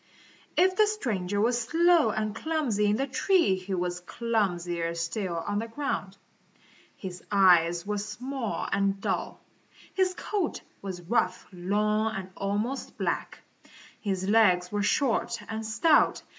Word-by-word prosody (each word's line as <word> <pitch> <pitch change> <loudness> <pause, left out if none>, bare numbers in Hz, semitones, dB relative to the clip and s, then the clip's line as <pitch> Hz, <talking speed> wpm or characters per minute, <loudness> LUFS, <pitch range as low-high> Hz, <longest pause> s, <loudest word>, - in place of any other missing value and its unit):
If 370 +1 +4
the 430 -1 +5
stranger 205 - -2
was 240 +3 +2
slow 330 +1 +4
and 215 0 -2
clumsy 280 -11 0
in 205 - +3
the 270 - 0
tree, 310 - +2
he 185 +1 -4
was 180 0 -2
clumsier 175 -5 -1
still 170 +2 -2
on 205 - -1
the 225 - -4
ground. 225 -6 -3 0.8
His 185 -2 -8
eyes 175 -3 +4
were 210 0 -2
small 235 +4 -4
and 195 0 +1
dull. - - -3 0.5
His 370 -1 +1
coat 400 -6 -2 0.2
was 185 -3 -6
rough, 185 -1 0
long 210 +4 0
and 190 -1 -6
almost 210 +7 -3
black. - - -2 0.6
His 190 -3 -2
legs 185 -5 +4
were 205 0 0
short 235 +4 +1
and 220 0 -4
stout. 295 +9 +3
210 Hz, 135 wpm, -28 LUFS, 185-245 Hz, 0.8 s, the